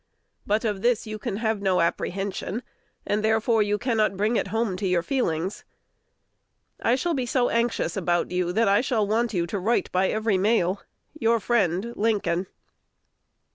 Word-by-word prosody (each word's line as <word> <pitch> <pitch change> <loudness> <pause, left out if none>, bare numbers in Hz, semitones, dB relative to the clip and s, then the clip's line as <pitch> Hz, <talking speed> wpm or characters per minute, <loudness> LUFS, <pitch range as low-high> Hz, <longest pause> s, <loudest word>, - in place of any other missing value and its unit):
But 215 +3 +1
of 205 -3 -1
this 240 0 +1
you 215 0 -6
have 220 -2 -1
no 190 -2 +2
apprehension; 195 +5 -2 0.4
and 210 +1 0
therefore 220 +1 +2
you 210 0 +1
cannot 215 -4 0
bring 215 +4 +1
it - - 0
home 225 -3 -1
to 195 0 -2
your 180 -2 +1
feelings. 190 - -1 1.2
I 235 - +3
shall 335 +6 -1
be 260 -4 -2
so 245 0 +1
anxious 235 0 0
about 175 -3 0
you, 180 -1 0
that 225 +4 +2
I 200 +2 +4
shall 230 -5 +1
want 225 +3 0
you 170 -1 +1
to 195 +4 -3
write 225 +6 0
by 185 +1 +2
every 215 -3 +1
mail. 200 -2 +1 0.3
Your 230 -6 +1
friend, 205 0 0
Lincoln. 195 -5 0
215 Hz, 165 wpm, -25 LUFS, 190-230 Hz, 1.2 s, I